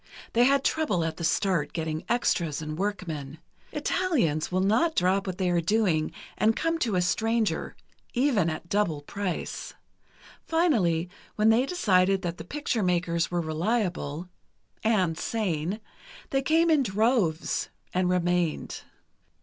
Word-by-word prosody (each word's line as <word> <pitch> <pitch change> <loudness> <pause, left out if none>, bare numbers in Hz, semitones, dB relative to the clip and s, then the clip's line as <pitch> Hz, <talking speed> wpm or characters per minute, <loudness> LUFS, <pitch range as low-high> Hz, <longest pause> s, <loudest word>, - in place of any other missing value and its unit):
They 240 +1 +5
had 275 +1 +3
trouble 290 - +1
at 165 -1 -3
the 170 - -5
start, 170 -2 +1
getting 160 -1 -3
extras, 170 -10 +1
and 155 -1 -5
workmen. 160 -7 -4 0.3
Italians 240 - 0
will 185 - +1
not 225 - +2
drop 190 +2 +2
what 185 -1 -3
they 190 -1 0
are 175 -1 +2
doing 170 -4 +1 0.3
and 220 +1 +3
come 330 0 0
to 225 - 0
a 180 - +2
stranger, 225 +4 0 0.4
even 240 - +2
at 155 +2 -5
double 170 -7 0
price. 195 +2 -4 0.7
Finally, 215 - +2 0.3
when 215 +1 +4
they 240 +4 +4
decided 195 - +2
that 175 -1 -3
the - - -5
picture 250 - -2
makers 175 -2 +1
were 175 -1 0
reliable—and 175 +1 -2
sane—they 215 - -3
came 325 +4 +3
in 305 -3 +5
droves, 215 -6 +1 0.2
and 180 0 +1
remained. 175 -2 0
185 Hz, 135 wpm, -27 LUFS, 170-230 Hz, 0.7 s, They